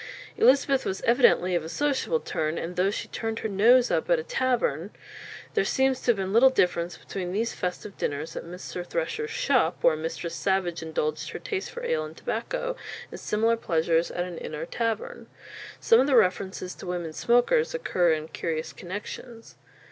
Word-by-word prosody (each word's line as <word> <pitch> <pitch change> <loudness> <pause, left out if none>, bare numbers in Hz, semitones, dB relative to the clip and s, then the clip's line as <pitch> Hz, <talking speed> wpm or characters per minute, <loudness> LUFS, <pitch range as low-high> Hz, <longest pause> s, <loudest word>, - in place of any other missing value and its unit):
Elizabeth 275 -8 +4
was 190 - -3
evidently 235 -7 +4
of 170 -2 +1
a 160 - -6
sociable 290 - 0
turn, 155 - -2
and 175 +2 -4
though 185 +2 +2
she 205 - -4
turned 225 -1 -3
her - - -2
nose 235 +5 +5
up - - 0
at - - +5
a 470 - -3
tavern, 245 - 0 0.6
there 430 - +2
seems 265 -1 +1
to - - -3
have 240 - +6
been 195 -1 -3
little 245 +4 +7
difference 175 -7 0
between 180 -2 -5
these 225 +5 -1
festive 185 +2 -4
dinners 150 +3 -3
at - - -4
Mr. 180 +1 -7
Thresher's 450 - -3
"shopp," - - +2
where - - +5
Mistress 165 +1 -4
Savage 180 -2 0
indulged 155 -1 -2
her - - -5
taste 395 -2 -4
for 485 - -8
ale 485 0 0
and - - -9
tobacco, - - -3 0.4
and - - -7
similar 225 +2 +1
pleasures 165 -5 +1
at 175 - -2
an 175 -2 -7
inn 155 - -6
or 155 +2 -4
tavern. 225 +2 -3 0.5
Some 455 - +5
of 270 - +3
the 275 - +3
references 190 -3 +1
to - - -10
women 175 -3 -3
smokers 245 - +2
occur 180 - +2
in 155 0 -4
curious 160 -1 -3
connexions. 215 +5 -8
195 Hz, 185 wpm, -26 LUFS, 170-260 Hz, 0.6 s, little